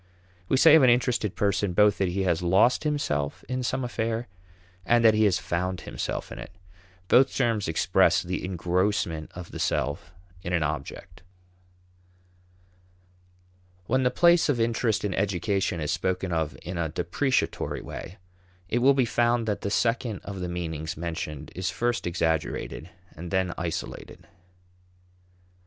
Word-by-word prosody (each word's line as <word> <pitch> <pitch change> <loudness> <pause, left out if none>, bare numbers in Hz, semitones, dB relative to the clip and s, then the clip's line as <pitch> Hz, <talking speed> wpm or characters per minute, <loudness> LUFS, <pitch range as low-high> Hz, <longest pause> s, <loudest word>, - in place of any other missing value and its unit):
We 135 - +3
say 155 +3 +7
of 160 - +8
an 130 - +6
interested 120 -4 +1
person 100 -2 0
both 105 +2 +4
that 95 - +2
he 95 +2 -1
has 85 -3 +1
lost 95 - +3
himself 75 - -1
in 130 +2 -2
some 125 +2 -1
affair 115 -1 -2 0.6
and 120 +4 +3
that 110 - +7
he 110 0 +3
has 95 -3 +3
found 90 +2 -2
himself - - -5
in - - -7
it. - - -8 0.6
Both 130 +6 +4
terms 115 -5 +1
express 85 +1 +3
the 90 +1 -4
engrossment 90 -2 -1
of 90 -1 -8
the - - -7
self 75 +2 -1 0.3
in 90 0 -4
an 85 -3 +2
object. 75 0 -5 2.6
When 130 +6 +1
the 125 - +3
place 170 +4 +4
of 130 -5 +1
interest 115 -2 0
in 100 - -1
education 95 -1 -1
is 75 0 -2
spoken 95 0 -1
of 80 0 -2
in 90 -1 -5
a 80 -1 -1
depreciatory 90 - -1
way, 95 - -8 0.5
it 120 - +1
will 135 +3 +5
be 130 -2 +3
found 120 0 +1
that 105 - -1
the 100 - -2
second 115 0 0
of 100 -2 -7
the 90 -1 -3
meanings 80 -2 -4
mentioned 80 -3 -5
is 95 0 -2
first 120 -5 -1
exaggerated 80 -1 -2 0.3
and 85 +2 -7
then 95 -1 0
isolated. 85 0 -6
95 Hz, 150 wpm, -26 LUFS, 85-120 Hz, 2.6 s, of